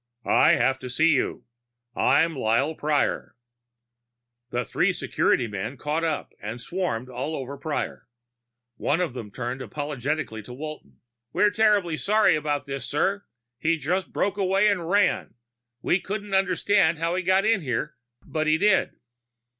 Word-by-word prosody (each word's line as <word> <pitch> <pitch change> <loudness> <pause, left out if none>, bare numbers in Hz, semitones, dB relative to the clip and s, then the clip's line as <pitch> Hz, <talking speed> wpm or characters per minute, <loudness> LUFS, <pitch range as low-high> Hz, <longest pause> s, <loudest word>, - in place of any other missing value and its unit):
"I - - +5
have 130 0 +2
to 125 - -7
see 160 +7 +3
you. 135 - -1 0.5
I'm 160 +5 +3
Lyle 130 +5 +1
Prior." 150 -3 -1 1.1
The 120 -1 -2
three - - +1
security - - +1
men 105 +5 -5
caught 150 +3 -2
up 160 -3 -2
and 110 +4 -5
swarmed 130 -5 -3
all 130 +5 -4
over 135 0 -5
Prior. 145 +2 -4 0.7
One 155 - 0
of 175 -8 -1
them 115 -5 -7
turned 125 +4 -5
apologetically 145 -1 -3
to 115 +4 -10
Walton. 155 +3 -9 0.3
"We're 205 +3 +4
terribly 205 -7 +2
sorry 210 -3 +3
about 145 -1 -1
this, 135 -1 -5
sir. 195 +7 0 0.3
He 165 +3 +1
just 180 +6 -2
broke 200 0 -1
away 195 +1 +3
and 180 -5 -1
ran. 195 - +2 0.5
We 180 - +2
can't 205 0 -5
understand 190 -2 +3
how 165 +2 -1
he 185 - 0
got 190 +2 +3
in 220 -3 +3
here, 140 +1 -2 0.3
but 155 -1 -2
he 155 +1 +4
did." 205 +2 +2
155 Hz, 150 wpm, -25 LUFS, 130-185 Hz, 1.1 s, I